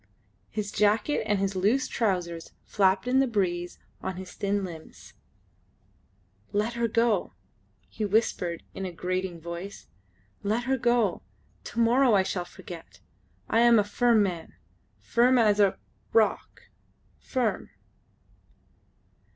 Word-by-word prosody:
His 205 -1 -4
jacket 210 +7 +2
and 205 - +2
his 195 0 -1
loose 210 +9 +2
trousers 180 -6 -2
flapped 190 +1 +2
in 260 +1 +3
the 270 - +3
breeze 180 -6 -1 0.2
on 190 - -4
his 185 0 -8
thin 200 0 -1
limbs. 165 -4 -10 1.4
"Let 210 +3 0
her 235 0 0
go!" 225 - +1 0.5
he 215 - -5
whispered 195 -5 0
in 195 - -6
a 185 - -3
grating 180 0 -3
voice. 170 +4 -7 0.6
"Let 215 +4 0
her 265 +1 0
go. 240 -5 +2 0.4
To 235 - -5
morrow 240 +1 +4
I 190 - +4
shall 180 -1 -3
forget. 175 -2 -11 0.5
I 225 - +2
am 235 0 +6
a 210 - +4
firm 225 +1 +3
man,... 175 -4 -4 0.4
firm 250 +2 +3
as 210 -3 +4
a... 200 -2 +4 0.4
rock,... 220 -2 +1 0.6
firm 250 -5 -2
205 Hz, 125 wpm, -27 LUFS, 185-230 Hz, 1.4 s, am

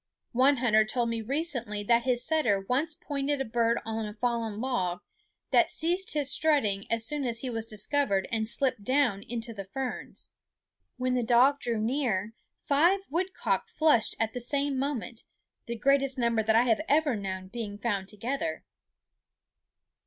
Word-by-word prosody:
One 265 +3 +4
hunter 220 -3 +4
told 235 +2 -1
me 230 -1 -2
recently 245 -5 -3
that 235 +2 +2
his 245 -2 +1
setter 245 -12 +2
once 300 +5 0
pointed 285 -1 -2
a 270 - -1
bird 230 +1 +1
on 220 -1 -3
fallen 230 -2 -2
log, 190 -9 -1 0.5
that 345 -1 +4
ceased 355 +3 +1
his 285 -2 +4
strutting 220 -11 +2
as 230 0 +1
soon 295 +3 -2
as 235 -2 -2
he 255 - -3
was 225 -1 -3
discovered 215 -1 +1
and 220 -1 -1
slipped 250 -2 0
down 255 -5 +1
into 230 +1 -5
the 200 -2 -7
ferns. 255 +6 -6 0.7
When 255 0 0
the 250 - +1
dog 245 +5 +4
drew 235 -4 -2
nearer, 225 -4 -1 0.3
five 340 +8 +3
woodcock 370 +7 -1
flushed 310 - +3
at 225 -1 0
the 245 - -4
same 280 +2 0
moment, 250 -4 -3 0.4
the 235 0 -4
greatest 275 +2 +2
number 235 -2 +1
that 220 0 +2
I 230 - +6
have 235 +2 +2
ever 295 -3 +3
known 190 -2 -5
being 210 -2 -5
found 205 -3 -2
together. 270 +10 -4
240 Hz, 160 wpm, -28 LUFS, 220-280 Hz, 0.7 s, I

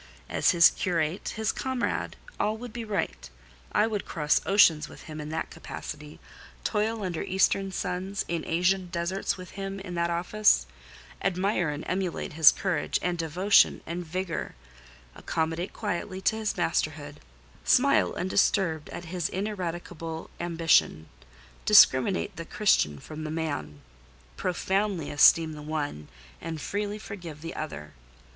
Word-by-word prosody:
As - - +3
his 170 -2 +7
curate, 170 -2 -1
his 220 -1 0
comrade, 260 -2 -2 0.2
all 215 +1 0
would 240 -1 -8
be 240 -1 -5
right: 200 - -3 0.4
I - - +3
would 215 -3 -2
cross 150 -3 +1
oceans 175 -6 +5
with - - -12
him 155 -1 -7
in 150 - -6
that 160 +1 -3
capacity; 150 0 -8 0.4
toil 215 0 -1
under 175 -4 -3
Eastern 195 +1 +1
suns, 185 +2 -3
in 170 -1 -2
Asian 180 +3 +1
deserts 175 +3 -2
with 185 -1 -10
him 195 0 -5
in 185 -2 -7
that 170 0 0
office; 175 - +3 0.6
admire 185 -2 +1
and 150 +1 -4
emulate 185 -3 -2
his 155 -1 +8
courage 185 -6 -1
and 180 0 0
devotion 180 +5 +4
and 170 +2 -4
vigour; 175 0 -4 0.6
accommodate 165 - -2
quietly 190 -2 -4
to 220 - +2
his 220 -1 -2
masterhood; - - -1 0.5
smile 280 +2 +4
undisturbed 180 -4 +1
at 175 - -7
his 170 0 -2
ineradicable 175 -5 -5
ambition; 165 - +2 0.5
discriminate 175 - +5
the 165 - -5
Christian 160 - +2
from 155 - -8
the 155 - -4
man: 145 - -4 0.5
profoundly 190 -2 -1
esteem 160 +2 +5
the 150 - -8
one, 145 - -4 0.3
and 165 -1 -5
freely 205 +6 -3
forgive 175 -8 -8
the 165 +1 -6
other. 75 - -6
175 Hz, 140 wpm, -27 LUFS, 160-195 Hz, 0.6 s, his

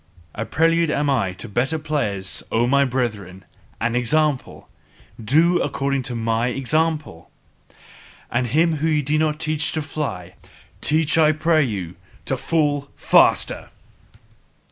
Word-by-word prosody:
A 115 - -5
prelude 165 +1 +2
am 145 -1 0
I 105 -9 0
to - - -7
better 125 +10 -1
players, 125 -12 -2
O 115 +1 +2
my 140 +3 +3
brethren! 105 -8 -3 0.3
An 115 +2 -1
example! 140 +3 0 0.6
DO 165 +10 +3
according 140 -1 -1
to 125 -1 -4
mine 115 +1 -1
example! 150 - -1 1.0
And 125 +1 0
him 160 +6 +2
whom 160 +3 0
ye 150 -2 +1
do 150 +3 0
not 155 -1 0
teach 155 -1 0
to 155 - -1
fly, 140 - -5 0.5
teach 155 +1 +1
I 155 -1 +5
pray 155 +1 +2
you 95 -9 -4 0.3
TO 135 - 0
FALL 145 +1 -1
FASTER! - - +2
140 Hz, 135 wpm, -21 LUFS, 115-155 Hz, 1.0 s, I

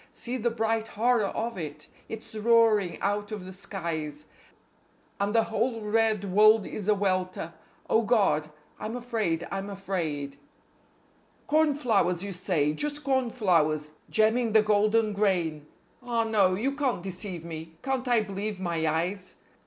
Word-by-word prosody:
See 245 +2 -3
the 240 0 +1
bright 225 -1 -1
horror 230 -1 +2
of 230 -2 -3
it! 150 -3 -7 0.2
It's 225 0 -8
roaring 220 -4 +3
out 205 +1 -1
of 205 -4 -5
the 185 - -8
skies, 160 -6 -5 0.9
And 200 +2 0
the 225 - +5
whole 225 +1 -1
red 215 -1 +1
world 215 +1 +6
is 210 -2 -5
a 210 - +4
welter.... 185 -3 -1 0.3
Oh 225 - +3
God! 200 -10 +2 0.3
I'm 220 +2 -4
afraid! 220 -9 -1
I'm 195 +1 -3
afraid! 165 -8 -3 1.1
CORNFLOWERS, 250 - +2
you 200 -1 -4
say, 170 -5 0
just 295 - -3
cornflowers, 185 - +1 0.2
gemming 220 +1 +2
the 220 -1 +6
golden 215 +1 +2
grain; 175 -7 0 0.3
Ah 240 -2 0
no! 205 -5 +3
You 265 +8 -1
can't 270 -10 -1
deceive 185 -2 -5
me. 160 -1 -8
Can't 265 -1 -1
I 240 -2 +4
believe 205 0 -4
my 170 -3 -1
eyes? 180 +5 -2
205 Hz, 140 wpm, -27 LUFS, 180-225 Hz, 1.1 s, world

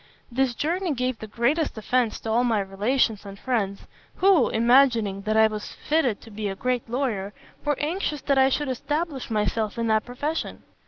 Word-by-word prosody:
This 255 0 +1
journey 340 - -1
gave 255 -1 -1
the 220 - -7
greatest 245 +6 0
offence 235 +1 0
to 225 - -3
all 235 +2 +3
my 230 -4 +2
relations 210 +3 0
and 200 -1 -9
friends, 200 -5 -1 0.3
who, 385 -2 +4
imagining 235 -4 +3
that 215 - +2
I 220 - +7
was 215 -1 -3
fitted 295 -9 0
to 225 - -13
be 210 0 -4
a 195 - -4
great 250 +2 -2
lawyer, 225 -6 -2 0.3
were 295 -1 0
anxious 305 -2 -2
that 275 -1 +2
I 265 0 +5
should 295 +2 -1
establish 295 +2 -3
myself 215 0 -1
in 230 - -1
that 220 -1 +3
profession. 290 +6 -4
240 Hz, 180 wpm, -25 LUFS, 215-275 Hz, 0.3 s, I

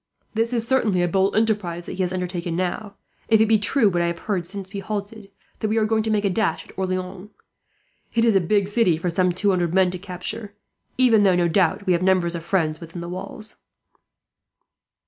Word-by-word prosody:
"This 225 +2 0
is 230 -2 -1
certainly 215 -9 +2
a - - +2
bold 190 +3 +1
enterprise 205 -6 0
that - - -7
he 190 - -3
has 180 -1 0
undertaken 180 -2 -3
now, 185 +3 -3 0.3
if 220 -1 +4
it 220 - +5
be 220 -1 +3
true 230 +2 +3
what 175 -3 +1
I 170 - +1
have 170 0 -2
heard, 185 -4 -2
since 195 +1 -7
we 200 - -3
halted, 205 +1 -5 0.3
that 215 - -1
we 215 +1 0
are 220 - +3
going 220 0 +1
to 220 - -2
make 210 -1 +1
a - - +3
dash 180 -4 -1
at - - -16
Orleans. 185 +1 -4 0.9
It 230 0 +3
is 230 - +4
a 195 - +4
big 200 +3 +1
city 205 -6 +2
for 175 +2 -2
two 185 +3 +1
hundred 175 -2 0
men 190 -1 +4
to 185 - -6
capture; 200 +3 -7 0.4
even 240 -4 +5
though, 190 -3 +4
no 175 -1 +2
doubt, 195 +3 +1
we 185 - +3
have 170 - +1
numbers 185 -2 +2
of 170 -1 -5
friends 160 -4 0
within 165 +1 -8
the 170 - -6
walls." 200 +4 -7
190 Hz, 220 wpm, -23 LUFS, 180-215 Hz, 0.9 s, it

